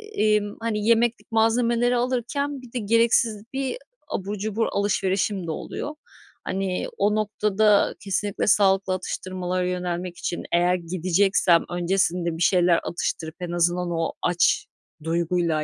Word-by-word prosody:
emm, 210 -1 +1
hani, 220 -2 -2
yemeklik 235 0 +2
malzemeleri 235 +2 +2
alırken 260 +3 -2
bir 250 - -14
de 250 - -1
gereksiz 225 -1 +2
bir 270 - -2 0.3
abur 200 +2 -4
cubur 215 +2 -1
alışverişim 195 -2 0
de - - -2
oluyor. 295 - -5 0.5
Hani, 190 -1 -2
o 205 +1 +2
noktada 210 -1 +2
kesinlikle 200 0 -1
sağlıklı 195 -2 +3
atıştırmalara 185 0 -3
yönelmek 180 -1 -3
için 175 - -4
eğer 175 +1 +3
gideceksem 180 0 +2
öncesinde 175 -1 0
bir - - -8
şeyler 175 -1 +4
atıştırıp 160 -1 -3
en 175 -1 -4
azından 175 +1 +1
o 165 -1 -1
aç 175 0 +2 0.4
duyguyla, 165 -1 0
195 Hz, 125 wpm, -24 LUFS, 175-220 Hz, 0.5 s, şeyler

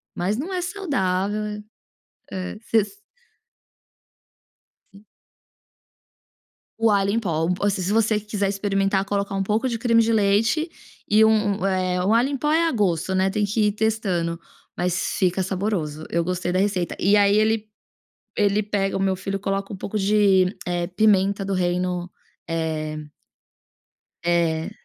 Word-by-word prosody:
mas 190 +4 -1
não 345 +8 -4
é 360 - -1
saudável, 210 - -2 0.7
eh, 185 -1 -4
hã, - - -10 0.2
s 220 - +2 2.0
Sim. 200 +2 -17 1.7
O 225 0 +3
alho 200 -1 +2
em 230 - +1
pó, 165 -4 -1
assim, 200 -2 +1
se 190 +3 -1
você 220 -1 +2
quiser 205 -1 -2
experimentar, 195 -1 0
colocar 200 0 -2
um 195 - 0
pouco 215 +6 0
de 230 -2 -2
creme 230 -1 +3
de 230 +1 +1
leite 220 +10 +2 0.4
e 215 +1 +5
u 220 - +6
um 210 -3 +1
eh, 185 -1 0
o 205 - +2
alho 235 +3 +3
em 280 - -2
pó 295 +3 -1
é 330 +1 +3
a 325 - 0
gosto, 190 -4 0
né, 190 +1 +2
tem 210 +1 0
que 210 +1 +1
ir - - 0
testando, 195 -6 -1 0.4
mas 180 +1 -1
fica 185 -1 +1
saboroso, 180 -6 -2
eu 170 0 0
gostei 180 0 -2
da 180 - 0
receita. 190 -3 0
E 200 +3 +3
aí 205 0 +4
ele 215 0 +1 0.7
ele 205 0 +2
pega 200 -2 -1
o - - -4
meu 190 -1 +1
filho 195 +1 -4
coloca 195 +1 -3
um 195 - -6
pouco 205 +3 -4
de, 195 -2 +3
eh, 175 -1 -1
pimenta 195 0 +2
do 195 - -2
reino, 180 -1 -1 0.4
eh 155 -2 -3 1.2
eh 170 -2 +1
200 Hz, 155 wpm, -23 LUFS, 185-215 Hz, 2.0 s, u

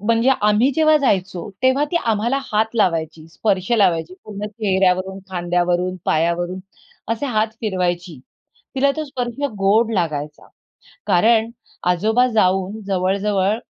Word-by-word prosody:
म्हणजे 230 +4 +2
आम्ही 210 +6 +3
जेव्हा 310 -1 +4
जायचो, 195 - -1
तेव्हा 260 +3 +3
ती 345 - 0
आम्हाला 230 +4 +1
हात 220 +2 +1
लावायची, 165 -6 0
स्पर्श 190 +3 -1
लावायची 180 -4 +1
पूर्ण 210 0 -6
चेहऱ्यावरून, 190 -3 0
खांद्यावरून, 180 0 0
पायावरून 175 +3 0 0.5
असे 230 +5 -3
हात 220 -3 +1
फिरवायची. 180 - -2 0.6
तिला 275 +1 +3
तो 310 - -2
स्पर्श 250 -3 -5 0.2
गोड 215 +4 +3
लागायचा. 150 -5 -3 0.6
कारण 220 +5 +3 0.4
आजोबा 220 +8 +2
जाऊन 190 +1 +1
जवळ-जवळ 195 +2 0
195 Hz, 120 wpm, -20 LUFS, 180-225 Hz, 0.6 s, जेव्हा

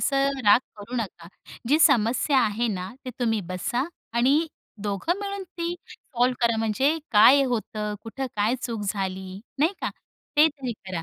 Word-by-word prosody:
असं 275 0 +1
राग 205 - +8 0.2
करू 210 +4 -9
नका. 190 -7 -5 0.4
जी 295 +4 +4
समस्या 260 +1 +4
आहे 230 +1 0
ना, 185 -3 -3
ते 255 - -4
तुम्ही 225 -3 +1
बसा 185 +7 -1 0.3
आणि 275 +7 +3 0.4
दोघं 210 - -1
मिळून 400 -1 -4
ती 340 -1 -4
सॉल्व्ह 250 -1 -1
करा. 230 -1 +1
म्हणजे 225 +8 +1
काय 255 +6 +7
होतं, 215 -4 -2
कुठं 265 +4 -5
काय 210 +4 +2
चूक 230 -3 -3
झाली. 190 -1 -4 0.2
नाही 315 +6 +3
का. - - -2 0.5
ते 300 +2 +7
तरी 275 -5 -5
करा. 180 -3 -4
235 Hz, 160 wpm, -25 LUFS, 210-275 Hz, 0.5 s, राग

